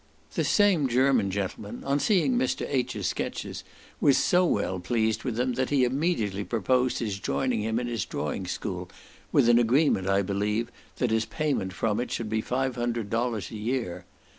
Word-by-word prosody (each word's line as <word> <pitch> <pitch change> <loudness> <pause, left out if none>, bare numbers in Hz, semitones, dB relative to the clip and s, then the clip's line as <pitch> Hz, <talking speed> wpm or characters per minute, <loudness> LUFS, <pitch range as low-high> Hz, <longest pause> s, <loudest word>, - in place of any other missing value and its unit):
This - - 0
same 195 -9 +4
German 130 -4 +3
gentleman, 100 +1 -4
on 140 +1 +1
seeing 210 - +2
Mr. 255 +1 0
H.'s 125 -7 -1
sketches, - - -3 0.4
was 140 - +4
so 180 0 +3
well 95 - 0
pleased 110 +4 0
with 125 -4 -2
them, 125 +2 0
that 130 +1 -1
he 140 -3 +3
immediately 125 - 0
proposed 125 +4 +1
his 105 -4 -3
joining 125 0 0
him 110 +1 -1
in 125 - -3
his 115 -5 -2
drawing - - -3
school, - - -4 0.4
with - - +4
an 120 0 +6
agreement, 120 -5 +3
I 100 +1 +3
believe 105 +4 -1 0.2
that 125 -3 0
his 110 0 +2
payment 140 - -2
from 110 +3 0
it 125 - -2
should 115 -2 -3
be 110 0 +1
five 130 +1 -1
hundred 120 -3 -2
dollars 115 -5 -1
a - - -7
year. 105 -6 -3
120 Hz, 180 wpm, -27 LUFS, 105-130 Hz, 0.4 s, an